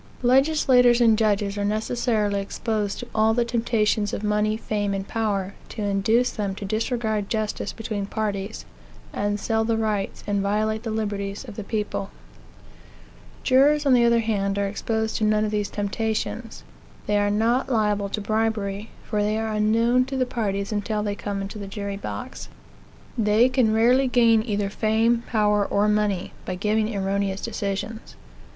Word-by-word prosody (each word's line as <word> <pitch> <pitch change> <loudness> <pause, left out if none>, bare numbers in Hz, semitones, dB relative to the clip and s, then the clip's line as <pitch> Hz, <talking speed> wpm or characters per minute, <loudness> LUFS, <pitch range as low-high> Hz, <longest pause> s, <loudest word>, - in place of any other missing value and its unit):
Legislators 255 -2 +4
and 230 -2 +5
judges 205 -2 0
are - - -1
necessarily 215 -1 0
exposed 210 +1 -2
to 245 - -7
all 220 0 +3
the 240 0 +2
temptations 225 -3 0
of - - -3
money, 210 +1 +1
fame, 205 -3 -2
and 195 0 -4
power, 200 -4 -1 0.2
to 215 - -5
induce 210 +5 +2
them 200 -2 -3
to 200 - -6
disregard 220 -1 -1
justice 215 -2 -2
between 210 -3 -4
parties, 205 -1 -3 0.5
and 205 0 -1
sell 220 +1 0
the 225 0 0
rights, 215 -3 -2
and 205 -1 0
violate 215 +2 0
the 230 - -5
liberties 205 0 -3
of 220 - -9
the 215 - -5
people. 205 -2 -3 1.3
Jurors, 290 +3 +4
on 275 - +5
the 245 -1 +5
other 235 0 +4
hand, 200 -3 -1
are 200 - +1
exposed 220 +2 -2
to - - -2
none 215 0 +3
of 210 - -2
these 210 -1 -1
temptations. 220 +2 -3 0.4
They 210 0 +2
are 205 0 +2
not 230 +6 +1
liable 210 -4 +1
to 210 - -3
bribery, 215 -1 -1
for 210 -2 -1
they 210 +1 0
are 220 0 -2
unknown 230 +4 +3
to 265 0 -4
the 255 - +2
parties 200 -5 -2
until 210 0 -1
they 205 -1 -1
come 200 -1 -4
into 200 +2 -7
the 200 - -6
jury 200 0 -4
box. 255 +5 -7 0.7
They 220 +3 +4
can 255 -4 +2
rarely 245 +4 +4
gain 230 -3 +4
either 205 -3 -2
fame, 225 +2 +2
power, 210 -2 +2
or 200 +1 +1
money, 210 -3 0
by 185 - -4
giving 215 +3 0
erroneous 195 0 -1
decisions. 210 0 -4
215 Hz, 165 wpm, -24 LUFS, 205-225 Hz, 1.3 s, and